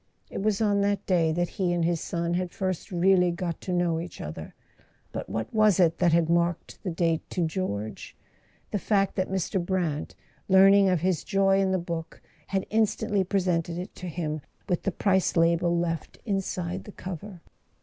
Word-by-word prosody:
It - - -4
was 215 0 +1
on 205 -2 +3
that 200 0 0
day 170 -4 +2
that 175 +2 0
he 180 -2 +2
and 170 -1 +1
his 170 -1 0
son 170 0 -2
had 180 0 -1
first 185 0 -3
really 180 0 +4
got 170 -1 -3
to 185 - -4
know 175 -2 +1
each 175 +1 -7
other; 80 +1 -7 0.6
but - - -5
what 110 0 -4
was 215 -4 +4
it 165 -2 +3
that 175 -2 +4
had 165 0 +3
marked 170 0 0
the 190 - -3
date 165 -1 +1
to 175 -3 0
George? 110 - -4 0.6
The 205 - 0
fact 195 -1 +1
that 185 -1 -1
Mr. 190 0 -1
Brant, 170 -5 -2 0.3
learning 195 +1 +7
of 180 -4 +1
his 185 -2 0
joy 195 -1 +3
in 190 -1 +2
the 190 - +2
book, 170 -2 -5 0.3
had 195 -1 -1
instantly 210 -2 +1
presented 175 -3 0
it 180 +2 -6
to 180 - -6
him—with 160 +2 -4
the 195 - -1
price 190 -1 +1
label 170 +1 +3
left 165 -2 -2
inside 190 -3 -2
the 210 - -9
cover. 185 0 -8
180 Hz, 180 wpm, -27 LUFS, 170-195 Hz, 0.6 s, learning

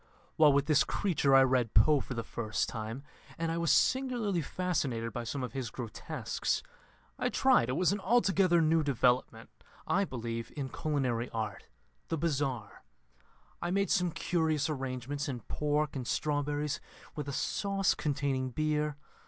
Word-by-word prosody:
While 155 -2 +6
with 140 0 +2
this 150 -2 +4
creature 155 -8 +2
I 135 - +8
read 125 -4 +1
Poe 145 +8 +6
for 125 - -5
the 115 - -2
first 110 -1 -2
time, 115 +4 -5 0.3
and 165 0 -1
I 165 - -1
was 170 -1 +2
singularly 245 -9 +2
fascinated 140 -9 -2
by 120 - -3
some 130 +3 -3
of 125 - -5
his 130 -4 -3
grotesques. 115 -3 -3 0.6
I - - +1
tried 115 - +3
it - - 0
was 180 +6 +2
an 205 - -1
altogether 190 -5 +3
new 160 +1 +3
development, 125 -4 +1 0.3
I 195 +1 +2
believe, 115 -5 -5
in 135 -2 -3
culinary 130 -6 -1
art 110 -3 -4 0.4
the 165 - -1
Bizarre. 140 -9 -2 0.8
I - - -1
made 200 +2 +1
some 180 -2 +3
curious 160 -2 0
arrangements 135 +1 -3
in 125 -3 -4
pork 150 0 -1
and 125 -3 -4
strawberries, 145 -1 -1 0.3
with 150 -2 -4
a - - -2
sauce 195 +6 0
containing 135 -3 -1
beer. 150 +1 -1
145 Hz, 155 wpm, -31 LUFS, 125-165 Hz, 0.8 s, I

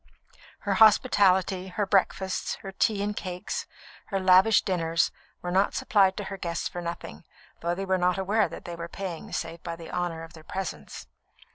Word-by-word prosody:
Her 200 - 0
hospitality, 190 -3 +4
her 200 +2 -1
breakfasts, 190 -1 +1
her 195 - -6
tea 200 +1 +1
and 210 0 -2
cakes, 185 - -4 0.4
her 195 - -1
lavish 190 +3 +6
dinners, 165 -4 +1 0.3
were 175 - -3
not 190 +2 +2
supplied 195 -2 +3
to 205 - -3
her 195 0 -6
guests 170 -3 -2
for 175 - -6
nothing, 170 - -6 0.4
though 170 +1 -1
they 195 +2 -3
were 190 -1 +1
not 180 +1 +2
aware 205 +3 +2
that - - -9
they 175 - -5
were 170 0 -6
paying 175 -1 -6
save 165 0 -4
by 170 -1 -5
the 165 -1 -10
honour 175 -2 -2
of 165 +1 -11
their 160 -2 -13
presence. 170 - -6
185 Hz, 180 wpm, -27 LUFS, 170-195 Hz, 0.4 s, lavish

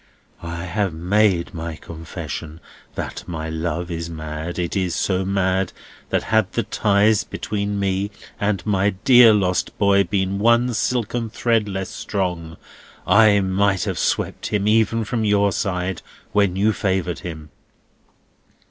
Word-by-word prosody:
"I 85 0 -5
have 95 -1 -1
made 90 +1 +1
my 85 -1 -5
confession 80 0 -7 0.4
that - - -5
my 80 -2 -4
love 85 +2 -3
is 85 0 -4
mad. 80 +1 -6
It 85 -2 -2
is 90 -3 0
so 95 -1 0
mad, 95 -1 0 0.4
that - - 0
had 110 -4 +3
the 115 - 0
ties 105 +1 +2
between 100 -1 -3
me 100 0 0 0.3
and 100 -3 -1
my 100 -1 +1
dear 125 -4 +8
lost 90 -5 0
boy 100 -1 +4
been 95 +2 -1
one 120 +3 +3
silken 115 0 -1
thread 115 -2 0
less 95 -1 -4
strong, 90 -5 -3 0.5
I 100 +1 +5
might 95 0 +1
have - - -2
swept - - -1
even 110 +2 +2
him - - -1
from 115 +1 -2
your 100 -1 +3
side, 90 -2 -2 0.3
when 100 -2 +2
you 105 +3 +2
favoured 95 -3 -1
him." 80 -4 -8
95 Hz, 140 wpm, -21 LUFS, 85-105 Hz, 0.5 s, dear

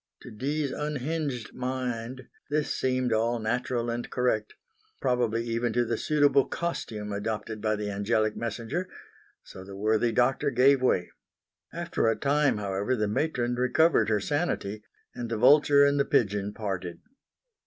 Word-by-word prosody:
To - - -10
Dee's 140 +6 -2
unhinged 150 -4 -3
mind 125 -1 -4 0.2
this 150 0 0
seemed 130 -2 0
all 115 +2 +1
natural 120 +1 -1
and 120 +1 -4
correct 115 -4 -1 0.4
probably 120 -2 0
even 115 0 -1
to 120 +1 +2
the 115 0 -1
suitable 145 0 +3
costume 110 -11 -4
adopted 105 +1 -4
by 110 -1 +1
the 105 0 -3
angelic 110 +2 0
messenger: 120 - -4 0.5
so 95 - -11
the 95 +1 -10
worthy 110 +3 +1
doctor 130 +5 +2
gave 135 +1 +4
way. 95 -8 +1 0.6
After - - -1
a 115 - +3
time 145 -1 +2
however 100 +4 -1
the 105 -3 0
matron 120 +1 -1
recovered 125 +5 +3
her 105 -1 +2
sanity, 110 - -2 0.3
and 120 -1 -5
the 115 - -2
vulture 140 +3 +6
and 140 0 +2
the 140 - +3
pigeon 105 -2 +1
parted. 95 -5 -5
120 Hz, 145 wpm, -27 LUFS, 110-135 Hz, 0.6 s, vulture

